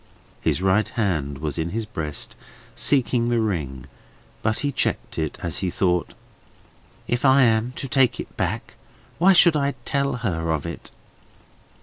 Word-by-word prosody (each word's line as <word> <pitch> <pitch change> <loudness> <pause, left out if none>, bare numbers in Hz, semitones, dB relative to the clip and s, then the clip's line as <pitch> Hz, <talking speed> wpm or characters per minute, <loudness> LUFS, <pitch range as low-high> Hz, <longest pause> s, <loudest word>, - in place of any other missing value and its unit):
His 90 - 0
right 95 +3 +3
hand 80 - -1
was 75 +1 -3
in 80 +1 -1
his 110 +4 -3
breast, 80 -8 -5 0.4
seeking 125 -3 +2
the 120 -1 +2
ring; 75 - -2 0.6
but 110 0 0
he 145 - +1
checked 125 - -1
it, 80 -2 -2
as 85 -2 -2
he 95 - -1
thought: 90 -1 0 0.9
"If 120 0 -1
I 135 0 +6
am 115 +1 +2
to 135 - -4
take 130 -1 +2
it - - -7
back, - - -2 0.5
why 190 +3 +6
should 170 -2 +6
I 140 -1 0
tell 140 -2 0
her 80 -4 -1
of 75 -3 -3
it?" - - -7
110 Hz, 155 wpm, -23 LUFS, 80-130 Hz, 0.9 s, I